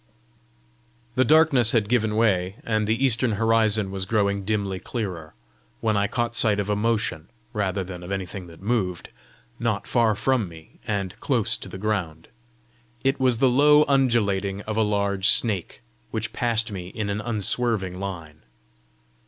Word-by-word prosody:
The 130 - +3
darkness 145 -6 +5
had 110 -4 +2
given 110 -2 +1
way, 95 -4 +1
and 110 -2 0
the 115 +5 +1
eastern 120 -2 +2
horizon 110 -2 +2
was 95 -1 -3
growing 100 -2 0
dimly 100 -2 -2
clearer, 90 -7 -5 0.4
when 110 -1 0
I 100 0 +2
caught 120 +1 -2
sight 105 -3 +3
of 100 +1 -1
a - - +1
motion 105 -7 -1 0.2
rather 100 -3 -1
than 90 -1 -8
of 90 +2 -8
anything 95 -1 -5
that 85 +2 -14
moved 100 -6 -1 0.5
not 115 -3 -1
far 115 -3 +2
from 110 -2 0
me, 80 -1 -15
and 100 -4 -2
close - - 0
to - - -9
the - - -8
ground. 95 -6 -3 0.7
It 135 +1 +1
was 130 -3 +3
the 130 - +3
low 150 +4 +5
undulating 105 -8 +1
of 110 0 -5
a 110 - +2
large 100 -2 +1
snake, 100 - +2 0.3
which 110 0 -4
passed 115 -1 0
me 90 -3 -6
in 100 +2 -4
an 105 +1 -2
unswerving 110 -3 -2
line. 85 -6 -7
105 Hz, 160 wpm, -24 LUFS, 95-115 Hz, 0.7 s, darkness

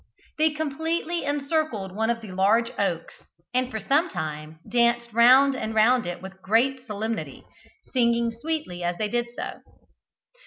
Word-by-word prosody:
They 315 +1 +5
completely 320 +2 -2
encircled 280 - -1
one 220 +1 0
of 235 -1 0
the 215 -4 -9
large 210 +5 +2
oaks, 180 -5 -2 0.3
and 255 0 +1
for 220 - -4
some 295 +10 +2
time 155 -2 -5
danced 235 +1 +2
round 260 +4 +6
and 220 -3 -4
round 230 0 +4
it 175 +1 -5
with 190 0 -10
great 255 +6 +1
solemnity, 220 +1 -4 0.5
singing 235 -2 +2
sweetly 235 - -4
as 175 0 -1
they 215 -1 -1
did 240 +2 -1
so. - - -5
235 Hz, 150 wpm, -25 LUFS, 200-270 Hz, 0.5 s, round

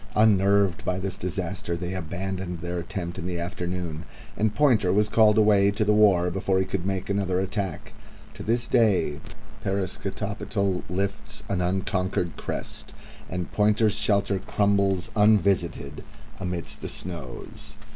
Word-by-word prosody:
Unnerved 100 -3 +4
by 90 - -1
this 95 -1 -3
disaster, 90 0 -3
they 90 +2 -4
abandoned 90 0 -4
their 85 +1 -3
attempt 90 0 -5
in 90 - -4
the 90 -1 -2
afternoon, 85 -2 -4 0.3
and 105 0 0
Pointer 120 -11 +4
was 105 +2 +3
called 110 0 +5
away 105 -2 +5
to 105 +2 0
the 105 - +4
war 95 -5 +4
before 95 +1 0
he 95 - +2
could 95 -1 -3
make 95 -1 -2
another 95 -2 0
attack. 95 -3 -3 0.4
To - - -10
this 120 +2 0
day 95 -10 +2 0.4
Parascotopetl 100 0 -2
lifts 100 +3 -3
an 95 -2 0
unconquered 90 -1 -1
crest, - - -5 0.3
and 90 0 -4
Pointer's 105 0 +3
shelter 100 -2 +1
crumbles 100 -3 +1
unvisited 100 -8 +2 0.4
amidst 90 -2 -4
the - - -5
snows. 80 -9 -7
95 Hz, 135 wpm, -26 LUFS, 90-100 Hz, 0.4 s, called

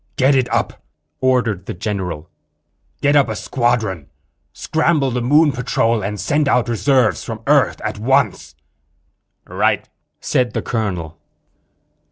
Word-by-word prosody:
"Get 135 +2 +3
it 130 -3 +1
up," - - -1 0.4
ordered 120 -8 0
the - - -5
general. 90 -5 -4 0.7
"Get 145 0 +3
up 140 -2 +4
a 110 - -3
squadron. 110 - -1 0.4
Scramble 155 -4 0
the 125 0 -1
Moon 145 +5 +4
patrol 115 -3 0
and 105 +1 -4
send 145 -1 +1
out 125 -1 +2
reserves 125 +1 +1
from 115 -1 -7
Earth 140 -1 +3
at 110 -1 -4
once." 130 +5 0 0.9
"Right!" - - 0 0.3
said 125 -1 0
the - - -2
colonel. 90 -9 -3
120 Hz, 130 wpm, -19 LUFS, 105-135 Hz, 0.9 s, up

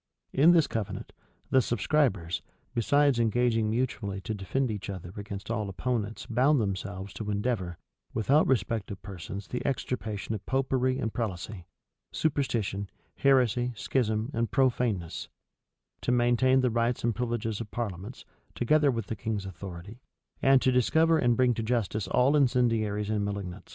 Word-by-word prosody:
In 145 +5 +6
this 170 -3 +6
covenant, 100 -3 -4 0.4
the 130 - +6
subscribers, 105 - +1 0.3
besides 140 +2 +3
engaging 115 -1 +2
mutually 110 -4 -1
to 105 +4 -4
defend 110 +6 -1
each 105 -1 -5
other 90 -2 -6
against 100 +1 -6
all 110 -3 -1
opponents 110 +1 -2
bound 130 +5 +3
themselves 100 -1 -3
to 105 -2 -5
endeavor, 100 -5 -1 0.3
without 140 +8 +3
respect 115 -4 0
of 100 - -6
persons 95 +1 -7
the 125 - -4
extirpation 110 -6 -2
of 105 - -5
Popery 130 -1 +1
and 115 -5 -2
prelacy, 100 -4 -4 0.5
superstition, 115 -10 -1 0.3
heresy, 125 -3 +3
schism, 110 0 0
and 115 0 0
profaneness; 120 - 0 0.7
to - - 0
maintain 125 +2 +4
the 125 -2 +2
rights 115 +1 0
and 120 0 +2
privileges 115 -2 -2
of 110 - -6
parliaments, 105 0 -5 0.3
together 145 +4 +3
with 115 -5 -1
the 110 - -4
king's 105 -1 -3
authority, 95 +3 -8 0.4
and 135 -1 +5
to 130 - +4
discover 160 +6 +3
and 120 -4 +3
bring 125 -1 +4
to 115 - -3
justice 110 -3 -1
all 130 +4 +3
incendiaries 115 -6 +2
and 105 -1 0
malignants. 100 -2 -5
115 Hz, 145 wpm, -28 LUFS, 100-125 Hz, 0.7 s, In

